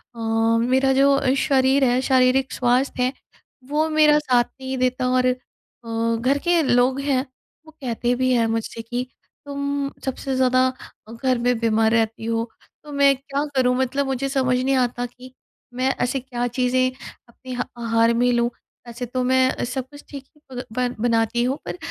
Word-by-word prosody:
अ, - - -11 0.5
मेरा 265 +1 +3
जो 275 -1 +3
शरीर 270 -1 +2
है, 250 0 +3
शारीरिक 260 0 +2
स्वास्थ्य 250 +1 +1
है, 255 +1 0 0.6
वो 310 +2 +1
मेरा 305 -1 +5
साथ 255 -5 +2
नहीं 265 +1 -7
देता। 255 0 0
और 255 0 +2
अ, 255 0 +1 0.8
घर 260 +4 +1
के 345 -1 +3
लोग 255 0 +2
हैं, 275 -2 0 0.4
वो 315 - -14
कहते 240 -1 -1
भी 255 +1 +1
हैं 235 -2 +3
मुझसे 225 0 -3
कि 245 +2 -4 0.4
तुम 280 0 -2 0.2
सबसे 265 0 -3
ज़्यादा 255 0 +3 0.4
अ, - - -11
घर 255 +2 0
में 245 0 +1
बीमार 225 -1 +2
रहती 225 -1 0
हो। 230 0 -1 0.3
तो 300 - -11
मैं 280 -1 +4
क्या 275 +1 -3
करूँ 250 -1 +3
मतलब 260 +2 0
मुझे 270 0 -2
समझ 260 -2 +1
नहीं 265 +1 +1
आता 245 -1 0
कि, 250 +1 -13 0.4
मैं 255 +1 0
ऐसे 250 +2 0
क्या 245 -1 -3
चीज़ें 255 +1 +1 0.4
अपने 255 +2 -10
ह 245 0 -1
आहार 230 0 +2
में 245 +1 +2
लूँ, 235 0 +2 0.4
वैसे 235 +1 -6
तो 250 +2 -2
मैं 260 0 +3
अ, - - -4
सब 255 +1 -4
कुछ 290 0 -13
ठीक 275 -2 -9
ही 300 - -26 0.2
प - - -4
बन 250 +1 -1
बनाती 230 0 +1
हूँ 260 +3 0
पर, - - -4
255 Hz, 180 wpm, -22 LUFS, 245-270 Hz, 0.8 s, मेरा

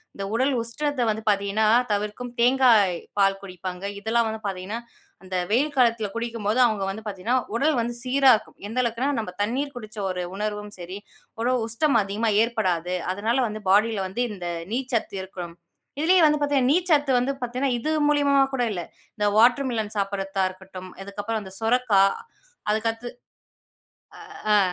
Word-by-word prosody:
இந்த 200 - -5
உடல் 260 +4 +2
உஷ்ணத்தை 260 +3 -2
வந்து 220 0 -1
பார்த்தீங்கன்னா 200 +1 +1 0.3
தவிர்க்கும். 210 +4 -2
தேங்காய் 235 -7 +5 0.2
பால் 195 -1 +3
குடிப்பாங்க. 185 -1 -7
இதெல்லாம் 225 +2 +1
வந்து 220 0 -4
பார்த்தீங்கன்னா, 195 +3 -4 0.4
அந்த 185 0 -6 0.2
வெயில் 285 +6 +2
காலத்தில 230 -4 +3
குடிக்கும்போது, 230 -1 -1
அவங்க 215 -4 0
வந்து 210 +3 -6
பார்த்தீங்கன்னா 210 +5 -1 0.2
உடல் 295 +5 +2
வந்து 235 +1 -2
சீரா 265 +1 +5
இருக்கும். 215 - -8
எந்த 225 - -6
அளவுக்குன்னா, 235 +3 -1
நம்ப 215 -5 -4
தண்ணீர் 270 +7 -2
குடிச்ச 215 -3 -9
ஒரு 180 -1 -3
உணர்வும் 210 0 -4
சரி 180 +2 -7 0.4
ஒரு 245 +2 +2 0.2
உஷ்ணம் 275 +6 +2
அதிகமா 205 +3 -1
ஏற்படாது. 185 -7 -1 0.2
அதனால 220 +6 0
வந்து 215 0 -6
பாடியில 205 +1 +3
வந்து 230 +7 -2
இந்த 180 -4 -6 0.3
நீர்ச்சத்து 245 -5 -2
இருக்கும். 180 -3 -7 0.5
இதுலயே 355 +4 +4
வந்து 300 0 +2
பார்த்தீங்கன்னா, 280 -3 +2
நீர்ச்சத்து 310 -5 +2
வந்து 260 +3 0
பார்த்தீங்கன்னா, 250 +2 -1
இது 270 - -3 0.2
மூலியமா 280 -2 +4
கூட 250 - +1
இல்ல. 175 -3 -4 0.3
இந்த 210 - 0
வாட்டர்மிலன் 235 -2 +3
சாப்பிடுறத்தா 195 -1 -1
இருக்கட்டும். 185 0 -11
இதுக்கப்புறம் 205 +3 -4
இந்த 190 - -10
சொரைக்கா, 225 -3 +3 0.7
அதுக்கடுத்து 225 +2 -1 1.2
அ. - - -14 0.2
அ. - - +6
225 Hz, 150 wpm, -24 LUFS, 200-250 Hz, 1.2 s, அ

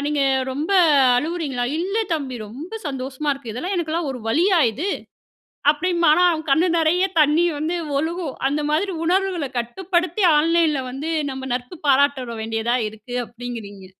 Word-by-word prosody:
நீங்க 295 -1 0 0.3
ரொம்ப 295 +7 -3 0.5
அழுவுறீங்களா? 295 -3 -2
"இல்ல 380 +5 -2 0.2
தம்பி 270 -5 -4
ரொம்ப 275 - -9
சந்தோஷமா 270 +1 -3
இருக்கு. 270 -5 -7
இதெல்லாம், 350 - -3
எனக்கெல்லாம், 330 -2 -1
ஒரு 250 - -7
வலியா 345 - +3
இது?" 305 - -3 0.8
அப்படிம்பான். 340 0 +2
ஆனா, 360 - +4
அவன் 315 -1 -4
கண்ணு 320 +7 +4
நெறய 340 +4 +3
தண்ணீ 305 +3 +4
வந்து 320 +4 -1 0.2
ஒழுகும். 325 -1 -3
அந்த 290 +2 -1
மாதிரி, 365 +6 0
உணர்வுகளை 360 -5 0
கட்டுப்படுத்தி 355 - -1
ஆன்லைன்ல 315 -2 +2
வந்து, 280 +5 -4 0.2
நம்ம 265 0 -6
நட்பு 250 +7 -5
பாராட்ட 280 -1 +3
தொ 230 - -6
வேண்டியதா 225 +2 -1
இருக்கு. 220 +3 -10
அப்டிங்குறீங்க. 230 -5 -8
300 Hz, 145 wpm, -22 LUFS, 255-340 Hz, 0.8 s, ஆனா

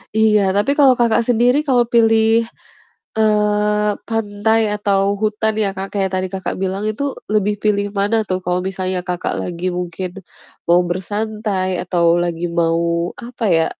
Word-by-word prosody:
Iya, 210 -3 +3
tapi 205 +9 +1
kalau 280 -3 +6
Kakak 235 0 +3
sendiri 245 +5 +2
kalau 245 -3 +3
pilih, 225 -1 +3 0.7
eee, 210 -1 +2 0.2
pantai 220 0 0
atau 200 -1 +1
hutan 215 0 0
ya 200 - +1
Kak, 195 +1 -7
kayak 195 -1 0
tadi 185 0 0
Kakak 190 0 -4
bilang 190 +1 -2
itu 275 +5 -3 0.2
lebih 210 -1 +1
pilih 205 -1 +1
mana 205 +3 +1
tuh 185 -1 -2
kalau 180 0 -1
misalnya 185 -1 -3
Kakak 180 -1 -2
lagi 180 +1 -3
mungkin 180 +1 -4 0.6
mau 175 +1 +4
bersantai 205 +2 -2
atau 170 -1 +2
lagi 175 0 -2
mau 170 0 0
apa 240 -1 -7
ya, 165 0 +3
205 Hz, 150 wpm, -18 LUFS, 180-220 Hz, 0.7 s, kalau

